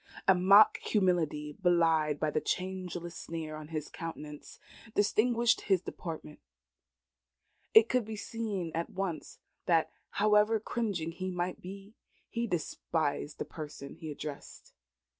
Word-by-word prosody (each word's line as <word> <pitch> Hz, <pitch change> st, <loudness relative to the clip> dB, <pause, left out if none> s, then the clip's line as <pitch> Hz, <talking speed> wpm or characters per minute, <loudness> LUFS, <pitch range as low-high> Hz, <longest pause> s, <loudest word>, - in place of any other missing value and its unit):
A 190 Hz, -, +8 dB
mock 195 Hz, +4 st, +7 dB
humility, 165 Hz, -7 st, +1 dB
belied 165 Hz, -4 st, +3 dB
by 155 Hz, -1 st, +1 dB
the 155 Hz, -, 0 dB
changeless 180 Hz, -2 st, -3 dB
sneer 160 Hz, -2 st, -5 dB
upon 155 Hz, -1 st, -8 dB
his 155 Hz, -2 st, -4 dB
countenance, 150 Hz, -3 st, -8 dB, 0.4 s
distinguished 230 Hz, +3 st, +3 dB
his 190 Hz, -3 st, +3 dB
deportment. 160 Hz, -3 st, -7 dB, 1.4 s
It 220 Hz, +1 st, +9 dB
could 250 Hz, 0 st, +2 dB
be 220 Hz, 0 st, -5 dB
seen 205 Hz, -5 st, -3 dB
at 165 Hz, +1 st, -2 dB
once 185 Hz, -4 st, -4 dB, 0.3 s
that, 165 Hz, -2 st, +3 dB, 0.2 s
however 210 Hz, +1 st, +4 dB
cringing 200 Hz, -8 st, -2 dB
he 185 Hz, +2 st, -4 dB
might 180 Hz, 0 st, -3 dB
be, 195 Hz, +3 st, -9 dB, 0.4 s
he 235 Hz, 0 st, -1 dB
despised 160 Hz, -4 st, -2 dB
the -, -, -3 dB
person 145 Hz, -3 st, -8 dB
he 160 Hz, -, -8 dB
addressed. 145 Hz, -1 st, -8 dB
175 Hz, 125 wpm, -31 LUFS, 155-205 Hz, 1.4 s, It